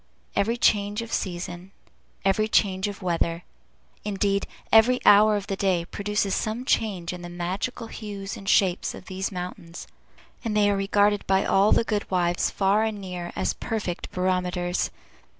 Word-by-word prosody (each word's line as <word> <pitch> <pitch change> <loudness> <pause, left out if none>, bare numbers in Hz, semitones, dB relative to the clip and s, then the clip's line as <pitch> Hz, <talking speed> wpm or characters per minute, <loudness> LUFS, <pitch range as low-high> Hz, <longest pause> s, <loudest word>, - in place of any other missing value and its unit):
Every 225 +4 +1
change 205 -1 +2
of 230 - -8
season, 180 0 -4 0.5
every 195 +2 +2
change 195 -3 +2
of 200 -1 -7
weather, 170 -1 0 0.6
indeed, 200 -1 0 0.2
every 240 +3 +6
hour 210 +1 +7
of 200 -1 -2
the 200 - -3
day 185 -3 +1
produces 205 +1 -1
some 225 +4 -2
change 185 -9 0
in 180 - -7
the 175 - -7
magical 185 +8 -3
hues 205 -3 -6
and 195 - -6
shapes 190 -4 +2
of - - -11
these 190 +1 -3
mountains; 180 -2 -7 0.6
and 220 -3 -1
they 205 -1 +4
are - - +1
regarded 205 +1 +2
by 190 0 +3
all 195 +2 +4
the - - +4
good 210 -2 -2
wives, 175 -1 +1
far 200 +2 +2
and 220 -2 -2
near, 180 -3 -6
as - - 0
perfect 215 -6 -4
barometers. 180 -1 0
195 Hz, 160 wpm, -25 LUFS, 180-210 Hz, 0.6 s, hour